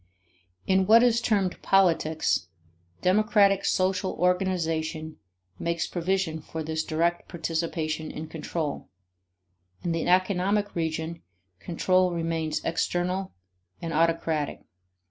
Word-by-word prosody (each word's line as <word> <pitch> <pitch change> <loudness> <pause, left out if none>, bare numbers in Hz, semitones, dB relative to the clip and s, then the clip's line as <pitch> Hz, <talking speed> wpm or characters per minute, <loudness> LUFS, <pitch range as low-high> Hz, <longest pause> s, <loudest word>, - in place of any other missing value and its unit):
In 190 0 +2
what 230 +2 +7
is 235 -1 +3
termed 200 -6 0
politics, 165 - +2 0.6
democratic 200 0 +4
social 185 0 +1
organization 165 -4 -1 0.4
makes 170 0 -1
provision 175 -2 -1
for 160 +1 -6
this 160 0 -2
direct 170 +2 -1
participation 160 -1 -2
in 155 - -6
control: 160 -1 -4 0.9
in 175 - -1
the 165 -1 -1
economic 190 +3 +2
region, 160 0 -3 0.4
control 180 - +1
remains 165 -2 -2
external 180 +3 -1 0.5
and 165 -1 -4
autocratic. 165 -2 0
170 Hz, 100 wpm, -27 LUFS, 160-190 Hz, 0.9 s, what